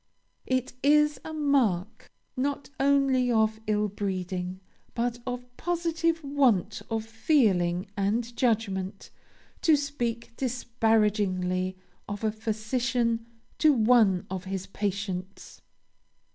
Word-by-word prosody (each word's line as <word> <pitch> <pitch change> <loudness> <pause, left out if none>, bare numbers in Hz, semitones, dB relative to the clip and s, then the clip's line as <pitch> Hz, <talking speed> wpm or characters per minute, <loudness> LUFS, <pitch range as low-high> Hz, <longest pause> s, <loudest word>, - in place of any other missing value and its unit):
It 255 -1 0
is 300 0 +4
a 320 - -6
mark, 240 - 0 0.2
not 280 +1 -2
only 275 -2 +3
of 220 -1 +2
ill 210 0 +2
breeding, 185 -2 -3 0.4
but 240 0 -1
of 245 0 -5
positive 330 -1 0
want 250 -9 +2
of 225 -1 -2
feeling 215 - +2
and 225 +4 -1
judgment, 200 -6 -1 0.5
to 320 - +5
speak 240 -6 -3
disparagingly 210 -7 0 0.3
of 205 +1 -5
a 215 - +2
physician 230 +2 -1 0.3
to 310 -2 +6
one 220 -6 +4
of 185 0 -5
his 190 0 -4
patients. 195 -1 -4
225 Hz, 105 wpm, -27 LUFS, 195-260 Hz, 0.5 s, to